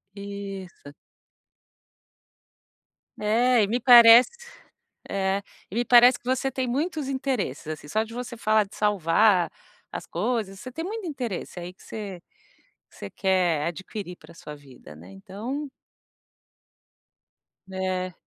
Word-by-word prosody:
Isso. 195 -6 -8 2.3
É. 230 +2 +3
E - - +1
me 240 +4 -1
parece 235 0 +8 0.8
é, 195 0 -1 0.3
e - - -9
me 240 +1 0
parece 245 +1 +6
que 280 - -41
você 260 +1 0
tem 260 0 -2
muitos 300 +2 -2
interesses, 260 - -3
assim, 155 -1 -7
só 215 +7 0
de 225 - -13
você 245 -1 -6
falar 215 -1 +2
de 195 - -15
salvar 200 -1 +3 0.4
as - - -6
coisas, 210 -6 -3
você 255 - -8
tem 325 +6 -5
muito 425 0 -5
interesse 245 - -5
aí 175 +1 -7
que - - -21
você 200 -5 -7 0.7
você 100 - -9
quer 180 -5 +1
adquirir 180 +2 -6
para - - -16
sua 150 -2 -10
vida, 130 - -15
né, 85 +5 -14
então. 230 - -6 2.0
É. 185 -1 -3
210 Hz, 130 wpm, -25 LUFS, 185-245 Hz, 2.3 s, parece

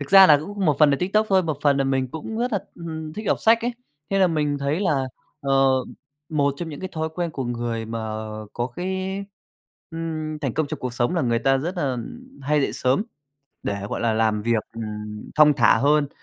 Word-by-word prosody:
Thực 145 - -6
ra 195 -1 +10
là 150 -3 +7
cũng 200 +4 -4
một 150 -3 +3
phần 150 -2 +6
là 140 - +2
TikTok 210 +4 +2
thôi, 190 -1 +4
một 155 -5 -2
phần 145 -2 +4
là 135 - +1
mình 135 -1 0
cũng 160 - -6
rất 245 +1 -1
là, 205 - +2 0.2
ừm 170 - -9
hừm, 160 -1 -5
thích 215 +5 -6
đọc - - +1
sách 225 +1 +5
ấy. 240 +1 -1 0.4
Thế 195 - +2
là 190 - +5
mình 150 -4 0
thấy 140 +6 -1
là, 145 -9 +1 0.3
ờ, 135 -1 +3 0.6
một 140 -3 +1
trong 170 +2 -5
những 150 -3 -7
cái 185 - -4
thói 160 0 -2
quen 175 -1 -2
của 135 -3 -4
người 120 -1 -3
mà, 115 +1 -4
à, 110 -1 -4 0.3
à, - - -9
có 120 0 -2
cái, 190 +7 -3 0.7
ừm, 155 -2 -4
thành 135 -6 -3
công 155 -1 +1
trong 155 +1 -5
cuộc 125 -1 -3
sống 120 +7 +1
là 170 - +1
người 115 -2 +2
ta 135 +2 +2
rất 170 +7 -3
là 175 - -1
ừm, 240 - -8
hay 150 +2 +2
dậy - - 0
sớm, 130 +9 +1 0.6
để, 100 - -1
gọi - - -3
là, 115 -1 +2
làm 110 -1 +1
việc, 115 -1 +1
ừm, 105 -1 -6
thong 150 -1 +7
thả - - +5
hơn. 145 +2 +3
150 Hz, 240 wpm, -23 LUFS, 130-175 Hz, 0.7 s, ra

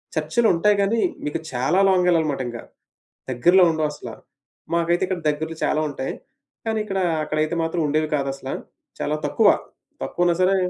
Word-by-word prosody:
చర్చ్‌లు 235 -2 +1
ఉంటాయి 205 +5 +3
గానీ 220 +3 +1 0.3
మీకు 150 - -2
చాలా 135 +9 +1
లాంగ్ 180 -1 +3
యెళ్ళాలనమాట 155 -6 +2
ఇంగ. 120 -1 -5 0.7
దగ్గరలో 175 +10 +5
ఉండవసల. 155 -2 -3 0.6
మాకైతే 170 +1 +1
ఇక్కడ 185 -2 -2
దగ్గర్లో 160 +2 -3
చాలా 155 - +1
ఉంటాయి. 135 -1 -4 0.5
కానీ 220 -1 0
ఇక్కడ 195 -2 -2 0.2
అక్కడైతే 155 +2 -1
మాత్రం 165 +1 -1
ఉండేవి 155 +1 +1
కాదసల. 135 -1 -3 0.5
చాలా 150 - 0
తక్కువ. 205 +8 +4 0.5
తక్కువున్నా 175 0 +1
సరే 185 +1 +4
165 Hz, 140 wpm, -23 LUFS, 150-185 Hz, 0.7 s, దగ్గరలో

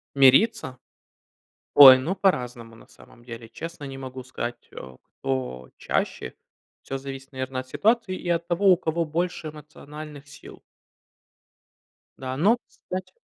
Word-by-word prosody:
Мириться? 135 - +4 1.0
Ой, 135 -2 +11
ну, 165 +9 -2
по-разному, 125 -12 -1
на 115 - -17
самом 120 - -19
деле. 115 -1 -9
Честно, 165 +4 -8
не 135 -1 -7
могу 130 -1 -8
сказать, 120 -2 -6
э, 65 -1 -11 0.2
кто 65 -1 -3
чаще. - - -2 0.5
Всё 135 - -5
зависит, 135 0 -9
наверное, 130 0 -4
от 130 - -16
ситуации 220 - +1
и 175 - -6
от 170 0 0
того, 190 +3 +2
у 180 - +5
кого 165 0 -1
больше 170 0 -3
эмоциональных 150 -1 -11
сил. 145 - -13 1.6
Да, 130 0 -5
но 210 +10 +4
кстати 185 0 -8
140 Hz, 135 wpm, -25 LUFS, 130-170 Hz, 1.6 s, Ой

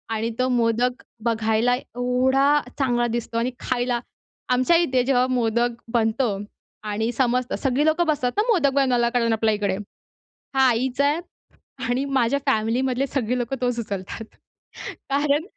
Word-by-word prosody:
आणि 225 +1 -1
तो 255 - +2
मोदक 245 +1 +1 0.2
बघायला 225 +1 +2
एवढा 260 +3 +1 0.2
चांगला 240 -3 +1
दिसतो 230 -1 -3
आणि 240 +2 0
खायला. 245 -1 -1 0.5
आमच्या 255 +7 +3
इथे 260 -7 +2
जेव्हा 255 -1 +3
मोदक 240 -1 +1 0.2
बनतो 225 -2 +1 0.5
आणि 220 +3 -1
समजतं 250 0 0
सगळी 270 +2 +2
लोकं 315 +2 +2
बसतात 255 -5 +1
ना - - +5
मोदक 320 -10 +3
बनवायला 250 -4 +2
कारण 235 -2 +1
आपल्या 220 0 +2
इकडे. 205 -2 -1 0.8
हा 265 -1 +5
आईचा 265 +5 +1 0.7
आणि 250 +2 +1
माझ्या 270 -1 +1
फॅमिलीमधले 255 +2 +1
सगळे 250 -2 -1
लोकं 245 +2 -2
तोच 245 -1 0
उचलतात. 200 -1 -5 0.9
कारण, 285 +2 +1
245 Hz, 135 wpm, -23 LUFS, 230-265 Hz, 0.9 s, ना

